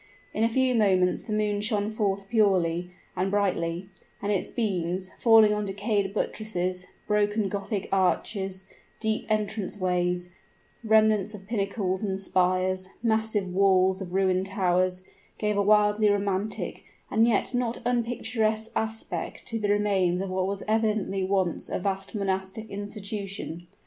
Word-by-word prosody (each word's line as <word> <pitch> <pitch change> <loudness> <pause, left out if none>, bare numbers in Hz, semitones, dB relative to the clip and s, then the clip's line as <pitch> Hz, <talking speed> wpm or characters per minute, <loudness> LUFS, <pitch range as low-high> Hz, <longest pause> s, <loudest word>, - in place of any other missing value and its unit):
In 220 - 0
a 230 - +4
few 260 +2 +2
moments 190 -5 +3
the 220 - -8
moon 210 -1 0
shone 210 -1 0
forth 200 -2 -1
purely 185 -5 +2 0.3
and 185 +1 0
brightly; 185 -3 -1 0.3
and 205 +1 -1
its 195 - 0
beams, 185 -4 -2
falling 225 -2 +6
on 210 0 -1
decayed 200 0 -1
buttresses, 185 -4 -3 0.2
broken 210 0 +1
Gothic 200 0 -3
arches, 190 0 0 0.3
deep 220 -1 -1
entrance 210 -1 -1
ways, 180 -1 0 0.5
remnants 215 -2 +3
of 195 -2 -12
pinnacles 200 -3 -1
and 195 -3 -2
spires, 185 0 +1
massive 220 -3 +1
walls 190 0 +3
of 180 -2 -6
ruined 190 -1 +2
towers, 185 -1 +1 0.3
gave 210 -1 0
a 200 - +2
wildly 210 +1 +4
romantic 200 0 -1 0.3
and 225 +2 +4
yet 230 +2 +2
not 245 -1 0
unpicturesque 225 -2 0
aspect 220 0 -3
to 230 -2 -3
the 205 -1 -1
remains 195 -4 +2
of 190 0 -3
what 185 0 0
was 200 0 -3
evidently 215 -3 +1
once 190 -3 0
a - - -1
vast 195 +2 -3
monastic 195 +2 -2
institution. 200 -4 -5
200 Hz, 140 wpm, -27 LUFS, 185-215 Hz, 0.5 s, falling